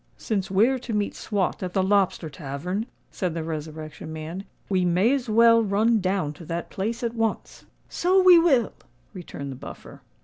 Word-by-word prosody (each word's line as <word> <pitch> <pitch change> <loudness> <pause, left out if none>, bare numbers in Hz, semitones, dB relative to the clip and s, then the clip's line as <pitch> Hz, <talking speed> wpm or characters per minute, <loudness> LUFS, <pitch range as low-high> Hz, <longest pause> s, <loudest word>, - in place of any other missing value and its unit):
"Since 195 -4 -2
we're 225 +8 +3
to 240 -2 -6
meet 210 -1 -1
Swot 200 -4 -2
at 180 -1 -4
the 190 - +2
Lobster 190 -4 +1
Tavern," 155 - -4 0.2
said 180 -4 -3
the 165 - -3
Resurrection 155 -1 -6
Man, 160 +5 -6 0.2
"we 185 -2 +1
may 180 +8 +3
as 260 -4 -2
well 230 +1 +6
run 220 +2 +2
down 185 -6 -1
to 165 +3 -12
that 170 +1 -5
place 225 +5 -3
at 235 -1 -1
once." 225 -2 -3 0.2
"So 370 +2 +2
we 365 -2 +8
will," 275 -10 +3 0.4
returned 150 -7 -7
the - - -7
Buffer. - - -11
195 Hz, 175 wpm, -25 LUFS, 165-230 Hz, 0.4 s, we